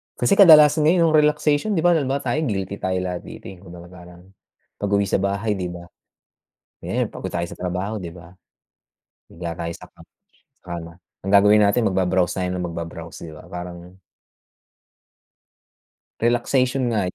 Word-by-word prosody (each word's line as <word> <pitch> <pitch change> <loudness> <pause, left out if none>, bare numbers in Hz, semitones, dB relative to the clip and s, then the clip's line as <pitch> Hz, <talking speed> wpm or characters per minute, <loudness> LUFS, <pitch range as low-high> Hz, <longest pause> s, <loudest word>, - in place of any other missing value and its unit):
Kasi 160 +12 +1
kadalasan 155 -4 +7
ngayon 170 +1 +4
yung 155 - +3
relaxation 150 +6 +2
'di 160 - 0
ba 175 - +5
halimbawa 140 -3 0
tayo 130 +4 -1
guilty 100 -2 -3
tayo 95 0 -2
lahat 90 -1 -4
dito. - - -11
eh, 90 - -14
'di 95 - -16
ba 85 0 -12
parang, 90 -1 -14 0.6
pag-uwi 100 0 +1
sa - - +1
bahay, 100 +2 -1
'di 90 -1 -3
ba? 85 - -9 1.0
Kaya - - -2
pagod - - -7
tayo 85 0 -1
sa - - -10
trabaho, 90 +4 -3
'di 85 -2 -7
ba? 85 -1 -14 1.0
Higa 85 0 -7
tayo 85 0 -4
sa - - -13
ka - - -30 0.6
sa - - -57
kama. 85 0 -8 0.3
Ang 95 - -2
gagawin 105 +1 +6
natin 110 +3 +2
mag 95 - -3
ba-browse 90 -1 +1
tayo 90 -1 -1
ng 90 -1 -3
mag 85 - -8
ba-browse, 85 0 -7
'di 80 - -9
ba? - - -14
Parang 90 0 -9 2.2
relaxation 125 +3 +1
nga 110 -3 0
95 Hz, 170 wpm, -22 LUFS, 90-125 Hz, 2.2 s, kadalasan